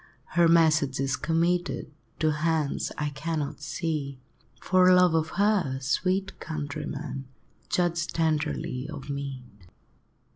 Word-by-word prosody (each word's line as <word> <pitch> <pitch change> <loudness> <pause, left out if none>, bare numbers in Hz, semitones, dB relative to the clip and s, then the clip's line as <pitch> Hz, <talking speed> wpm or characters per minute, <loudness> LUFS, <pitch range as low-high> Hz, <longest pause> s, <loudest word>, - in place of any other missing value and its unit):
Her 170 -1 +5
message 155 -5 +4
is 135 0 +1
committed 170 +2 0 0.3
To 155 -1 +3
hands 155 -1 0
I 150 0 -1
cannot 145 0 -3
see; 155 -4 -3 0.4
For 185 0 +4
love 180 -2 +6
of 160 -1 +1
her, 200 -10 +2
sweet 185 +8 -1
countrymen, 145 -3 -5 0.4
Judge 170 -2 +1
tenderly 155 -3 -1
of 145 -2 -6
me! 140 -2 -5
155 Hz, 110 wpm, -27 LUFS, 140-170 Hz, 0.4 s, love